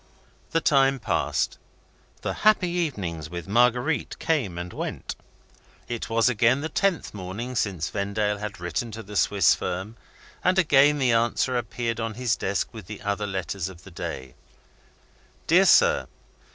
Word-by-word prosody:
The 165 - +1
time 135 -2 +4
passed - - -1 0.6
the - - -1
happy 210 -4 +4
evenings 100 - -3
with 85 +1 -6
Marguerite 125 +7 +2
came 130 - -1
and 90 0 -6
went. - - -5 0.7
It 120 -1 -4
was 115 +1 +3
again 120 +2 +3
the 160 - -3
tenth 195 +1 0
morning 100 +6 -5
since 95 -8 -1
Vendale 105 +1 -1
had 105 -2 -6
written 90 +7 -3
to 110 +1 -7
the 105 +1 -10
Swiss 100 -3 +4
firm; 95 +5 -4 0.5
and 185 +1 +3
again 150 -4 +5
the 130 -3 +2
answer 120 +2 +1
appeared 120 -1 -2
on 115 -1 -3
his 120 -2 0
desk 100 +1 -1
with 110 -6 -10
the 105 - -8
other 105 +1 -1
letters 95 -1 -3
of 90 -2 -13
the 95 - -13
day: 65 -6 -6 1.1
"Dear 180 +4 +5
Sir. 480 0 +5
115 Hz, 150 wpm, -25 LUFS, 95-135 Hz, 1.1 s, again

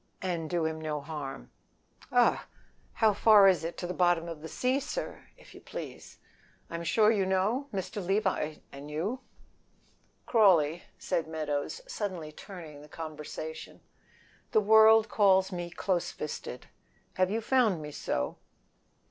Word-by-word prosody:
"And 170 -4 -3
do 170 -2 0
him 160 0 -3
no 155 -1 -2
harm." 140 - -7 0.6
"Augh! - - +3 0.5
How 220 -2 +3
far 205 -1 +7
is 185 -4 +3
it 165 +1 -5
to - - -4
the 180 - -3
bottom 175 -2 +2
of 165 -3 -7
the 160 - -7
sea, 250 - 0
sir, 400 - -6
if - - -17
you - - -13
please? - - -9 0.5
I'm 170 0 -4
sure 210 +6 +4
you 205 -4 +2
know? 195 +9 0
Mr. 190 0 -4
Levi 190 -5 0 0.2
and 140 +1 -9
you." 185 +12 -2 1.1
"Crawley," 175 - +4
said 165 - -2
Meadows, 155 - -3
suddenly 185 - -4
turning 160 -4 -10
the 150 - -14
conversation, 155 0 -7 0.7
"the - - +6
world 220 +1 +6
calls 190 -2 +3
me 175 -1 -4
close 175 0 -1
fisted, 150 - -6 0.5
have 185 0 +3
you 220 +3 0
found 230 -6 +2
me 150 -1 -7
so?" 65 - -3
180 Hz, 145 wpm, -29 LUFS, 155-210 Hz, 1.1 s, far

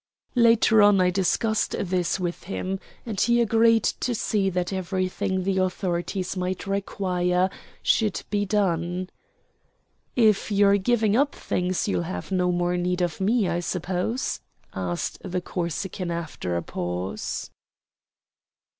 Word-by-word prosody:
Later 230 -2 +5
on 205 -1 +6
I 180 0 +4
discussed 205 +4 +1
this 180 -1 0
with 175 -1 -3
him, 190 0 -3 0.3
and 215 -5 -2
he 235 0 +4
agreed 230 -1 +4
to 245 - -1
see 205 -2 +1
that 180 0 -2
everything 185 0 -1
the 190 0 +1
authorities 185 0 -1
might 185 0 -2
require 185 -2 0 0.3
should 215 -4 +2
be 205 -1 +1
done. 185 -3 0 1.0
"If 220 -3 +3
you're 200 0 +5
giving 215 0 +2
up 280 +3 +2
things, 180 +2 -1
you'll 200 - +1
have 185 - -5
no 180 -1 +2
more 175 0 0
need 180 0 0
of 175 +1 -2
me, 210 +1 +2
I 175 0 0
suppose?" 180 +6 -2 0.3
asked 90 -2 -3
the 185 -1 -2
Corsican 180 +1 -3
after 160 - -3
a 85 - -3
pause. 90 +3 -4
185 Hz, 130 wpm, -25 LUFS, 175-205 Hz, 1.0 s, on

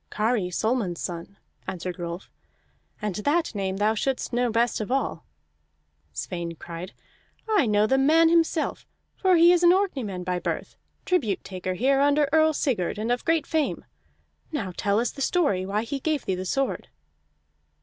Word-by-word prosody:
"Kari 215 -3 0
Solmund's 205 -2 -1
son," 175 +3 -6 0.3
answered 180 0 -5
Rolf, 170 +2 -6 0.7
"and 210 -2 -1
that 300 +9 0
name 195 -2 -2
thou 210 +2 +2
shouldst 255 +3 -2
know 245 0 +2
best 230 0 +1
of 215 - -4
all." 270 +1 -1 0.9
Sweyn 170 -2 -5
cried: 170 +3 -8 0.5
"I 420 - +3
know 210 0 +3
the 265 +5 +2
man 320 +4 +5
himself, 330 -1 +1 0.3
for 375 -2 +3
he 340 +1 +7
is 355 -1 +4
an 345 - +6
Orkneyman 265 - -1
by 180 0 -1
birth, - - -4 0.3
tribute 245 - 0
taker 185 -1 -4
here 270 +6 +2
under 290 +1 +3
Earl 315 0 +5
Sigurd, 225 - -1
and 220 +3 -2
of 245 - 0
great 325 -1 +2
fame. 315 -3 -1 0.7
Now 205 - -3
tell 200 +1 +1
us 235 0 0
the 275 - -9
story 235 - +1
why 210 +2 -1
he 275 +4 -4
gave 305 +1 -1
thee 190 - 0
the 185 +1 -4
sword." 270 +8 -1
230 Hz, 165 wpm, -25 LUFS, 190-295 Hz, 0.9 s, he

